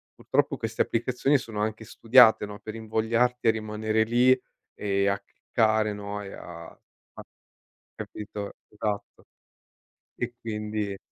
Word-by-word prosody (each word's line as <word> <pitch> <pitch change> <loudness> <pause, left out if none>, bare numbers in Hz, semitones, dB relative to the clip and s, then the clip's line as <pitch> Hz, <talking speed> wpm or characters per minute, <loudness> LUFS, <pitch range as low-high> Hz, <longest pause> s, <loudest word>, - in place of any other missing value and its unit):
purtroppo - - 0
queste - - -2
applicazioni 130 +4 +2
sono 115 -4 -6
anche 110 +1 -2
studiate, 115 0 +6
no, 105 0 -9
per 110 0 -8
invogliarti 115 +2 0
a - - +8
rimanere 110 0 0
lì 125 +3 +4 0.3
e 100 -1 0
a 100 0 0
cliccare, 110 0 0
no, 105 0 -5
e 100 -1 -8
a 85 -1 -10 1.2
capito, 105 -1 -6 0.2
Esatto. 105 -1 -4 1.0
E 120 0 -2
quindi 105 -2 -3
110 Hz, 120 wpm, -27 LUFS, 105-115 Hz, 1.2 s, a